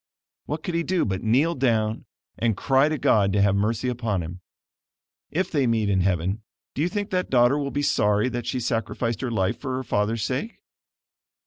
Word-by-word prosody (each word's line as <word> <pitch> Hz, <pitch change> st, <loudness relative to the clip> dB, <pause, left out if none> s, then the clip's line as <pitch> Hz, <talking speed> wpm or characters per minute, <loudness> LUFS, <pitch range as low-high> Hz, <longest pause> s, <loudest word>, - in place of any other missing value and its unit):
What 150 Hz, +1 st, -4 dB
could 180 Hz, -, -3 dB
he 170 Hz, -, +1 dB
do 180 Hz, +1 st, 0 dB
but 95 Hz, -1 st, -2 dB
kneel 130 Hz, +9 st, +2 dB
down 115 Hz, -6 st, 0 dB, 0.3 s
and 115 Hz, -4 st, 0 dB
cry 135 Hz, +5 st, +3 dB
to 155 Hz, -, -1 dB
God 100 Hz, -6 st, +3 dB
to 100 Hz, -, +3 dB
have 100 Hz, -1 st, +3 dB
mercy 110 Hz, +4 st, 0 dB
upon 115 Hz, -7 st, -1 dB
him? 90 Hz, +3 st, -8 dB, 0.9 s
If 185 Hz, +4 st, -1 dB
they 140 Hz, -5 st, +2 dB
meet 110 Hz, -3 st, +1 dB
in 95 Hz, -1 st, +2 dB
heaven, 95 Hz, +3 st, 0 dB, 0.3 s
do 140 Hz, -, -3 dB
you 170 Hz, -, +1 dB
think 205 Hz, +1 st, -3 dB
that 185 Hz, -1 st, -1 dB
daughter 125 Hz, +1 st, +4 dB
will 140 Hz, -1 st, -2 dB
be 145 Hz, +1 st, -2 dB
sorry 105 Hz, -3 st, +2 dB
that 120 Hz, -1 st, -4 dB
she 130 Hz, -, -1 dB
sacrificed 115 Hz, 0 st, -2 dB
her 130 Hz, -, -2 dB
life 95 Hz, -5 st, 0 dB
for 130 Hz, -3 st, -3 dB
her 130 Hz, -, -3 dB
father's 105 Hz, -1 st, 0 dB
sake? 140 Hz, -, -3 dB
120 Hz, 200 wpm, -24 LUFS, 105-140 Hz, 0.9 s, daughter